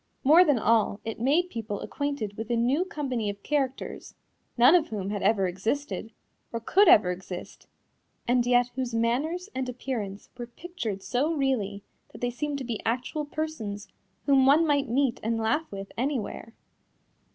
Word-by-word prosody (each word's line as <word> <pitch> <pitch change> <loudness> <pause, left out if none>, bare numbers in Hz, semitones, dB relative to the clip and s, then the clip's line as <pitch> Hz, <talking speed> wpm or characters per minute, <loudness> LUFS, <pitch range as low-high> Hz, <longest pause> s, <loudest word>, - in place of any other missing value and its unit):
More 315 +6 +8
than 295 -7 +3
all, 220 -2 +2
it 225 0 -4
made 310 +9 +2
people 215 -3 -4
acquainted 280 -8 -3
with 225 +2 -6
a 240 - +1
new 255 +9 +2
company 260 - -2
of 200 0 -7
characters, 275 -3 -2 0.4
none 245 +6 +7
of 345 -3 +4
whom 200 -2 -4
had 205 -2 -3
ever 200 -1 +3
existed, 220 +6 -3 0.4
or 230 - -3
could 385 - +4
ever 190 - +7
exist, 180 0 -8 0.6
and 245 0 +3
yet 245 0 +3
whose 250 -2 -3
manners 300 - 0
and 260 -1 -2
appearance 230 -6 -5
were 240 -1 -6
pictured 235 - -6
so 275 +6 0
really 215 -8 -1 0.3
that - - -10
they 245 0 0
seemed 290 +3 -3
to 275 - -5
be 235 -3 -4
actual 250 +6 -2
persons 290 -10 -5 0.4
whom 270 -2 +5
one 305 +4 +6
might 285 -5 +1
meet 260 0 +1
and 225 +1 -1
laugh 225 +9 0
with 195 0 -7
anywhere. 240 -3 -3
245 Hz, 165 wpm, -27 LUFS, 220-285 Hz, 0.6 s, More